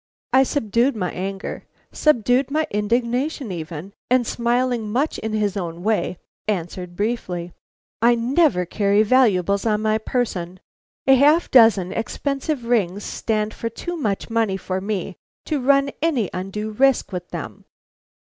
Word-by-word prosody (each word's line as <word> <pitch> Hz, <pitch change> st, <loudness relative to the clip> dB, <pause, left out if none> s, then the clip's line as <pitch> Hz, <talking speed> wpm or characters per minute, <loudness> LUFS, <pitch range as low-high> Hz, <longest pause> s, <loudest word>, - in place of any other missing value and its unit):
I 260 Hz, -, +7 dB
subdued 250 Hz, -1 st, +1 dB
my 180 Hz, -4 st, -2 dB
anger, 195 Hz, +2 st, -5 dB, 0.2 s
subdued 250 Hz, -2 st, +2 dB
my 310 Hz, +2 st, +1 dB
indignation 240 Hz, +5 st, -1 dB
even, 165 Hz, +2 st, -6 dB, 0.2 s
and 250 Hz, -1 st, +3 dB
smiling 240 Hz, -1 st, 0 dB
much 275 Hz, +7 st, 0 dB
in 220 Hz, 0 st, -4 dB
his 210 Hz, -2 st, 0 dB
own 175 Hz, -3 st, -5 dB
way, 215 Hz, -4 st, 0 dB, 0.3 s
answered 180 Hz, -2 st, -3 dB
briefly: 180 Hz, -5 st, -3 dB, 0.5 s
"I 240 Hz, +1 st, +5 dB
never 245 Hz, -, +2 dB
carry 200 Hz, +3 st, +2 dB
valuables 200 Hz, -5 st, +3 dB
on 215 Hz, -1 st, 0 dB
my 215 Hz, 0 st, +2 dB
person. 185 Hz, -7 st, -2 dB, 0.5 s
A 270 Hz, -, +6 dB
half 295 Hz, +6 st, +4 dB
dozen 225 Hz, -7 st, +6 dB
expensive 275 Hz, +3 st, -3 dB
rings 205 Hz, -5 st, 0 dB
stand 215 Hz, -1 st, -2 dB
for 230 Hz, -, -4 dB
too 350 Hz, +10 st, -5 dB
much 215 Hz, -, -2 dB
money 225 Hz, -4 st, 0 dB
for 185 Hz, 0 st, -3 dB
me 195 Hz, -2 st, -3 dB, 0.3 s
to 295 Hz, -3 st, -1 dB
run 275 Hz, +1 st, +3 dB
any 280 Hz, -, +1 dB
undue 195 Hz, +4 st, -4 dB
risk 270 Hz, +2 st, +2 dB
with 180 Hz, -1 st, -5 dB
them." -, -, -7 dB
220 Hz, 140 wpm, -22 LUFS, 195-255 Hz, 0.5 s, I